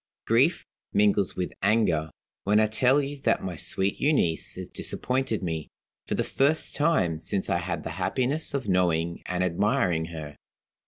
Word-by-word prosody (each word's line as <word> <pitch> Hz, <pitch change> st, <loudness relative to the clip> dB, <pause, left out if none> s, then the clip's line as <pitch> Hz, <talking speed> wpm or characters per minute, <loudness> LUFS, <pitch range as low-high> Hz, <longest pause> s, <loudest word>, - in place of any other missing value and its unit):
Grief -, -, +3 dB, 0.3 s
mingles 100 Hz, -2 st, +2 dB
with 90 Hz, -1 st, -2 dB
anger, 95 Hz, -7 st, +2 dB, 0.3 s
when 105 Hz, +2 st, +3 dB
I 110 Hz, -, +5 dB
tell 125 Hz, +6 st, +3 dB
you 140 Hz, +1 st, -4 dB
that -, -, +1 dB
my 90 Hz, -2 st, -4 dB
sweet 95 Hz, +5 st, -2 dB
Euneece 135 Hz, -, +1 dB
has -, -, -6 dB
disappointed 125 Hz, -5 st, -2 dB
me, 80 Hz, -3 st, -3 dB, 0.4 s
for -, -, -1 dB
the -, -, 0 dB
first 145 Hz, +4 st, +1 dB
time 120 Hz, -, +1 dB
since 95 Hz, +4 st, -2 dB
I 85 Hz, -, +2 dB
had 85 Hz, +1 st, -3 dB
the -, -, -5 dB
happiness 140 Hz, +4 st, -1 dB
of 130 Hz, -5 st, -3 dB
knowing 85 Hz, -3 st, +1 dB
and 90 Hz, 0 st, 0 dB
admiring 90 Hz, -2 st, +1 dB
her. 80 Hz, -3 st, -8 dB
95 Hz, 160 wpm, -27 LUFS, 85-125 Hz, 0.4 s, I